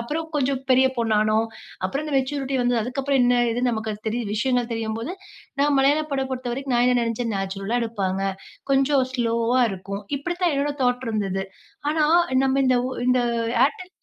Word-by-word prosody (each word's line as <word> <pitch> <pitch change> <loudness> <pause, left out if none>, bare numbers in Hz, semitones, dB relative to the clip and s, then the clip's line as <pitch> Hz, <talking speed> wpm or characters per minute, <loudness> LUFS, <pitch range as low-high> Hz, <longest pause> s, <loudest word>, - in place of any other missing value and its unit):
அப்புறம் 305 +7 -3
கொஞ்சம் 275 -2 0
பெரிய 260 +1 +6
பொண்ணா 225 -2 +1
ஆனோம், 215 +1 +2 0.4
அப்புறம் 275 +11 -2
அந்த 300 - -3
மேச்சூரிட்டி 270 0 -1
வந்தது. 245 -1 +2
அதுக்கு 250 +5 -3
அப்புறம் 275 -1 +2
என்ன 245 0 +4
இது? 235 +2 -1
நமக்கு 220 -1 -3
தெரி 225 +3 0 0.2
விஷயங்கள் 245 +1 0
தெரியும்போது, 225 +6 -3 0.5
நான் 290 0 +3
மலையாள 290 +3 +3
படம் 265 -1 -1
பொறுத்தவரைக்கும் 255 +1 -3
நான் 240 +1 +4
என்ன 250 - +3
நினச்சேன், 230 -1 -2
நேச்சுரலா 195 +5 -2
எடுப்பாங்க. 195 -4 -2 0.5
கொஞ்சம் 270 0 +3
ஸ்லோவா 235 +1 +1
இருக்கும். 195 +1 -6 0.2
இப்பிடி 350 +5 -4
தான் 345 - +3
என்னோட 290 +1 0
தாட் 250 +1 +1
இருந்தது. 195 -3 -1 0.5
ஆனா, 305 -1 +2 0.4
நம்ம 265 0 +2
இந்த 255 -1 +4
உ - - -4 0.2
இந்த 250 0 +4 0.5
ஏர்டெல் 365 +5 -7
245 Hz, 170 wpm, -23 LUFS, 225-270 Hz, 0.5 s, பெரிய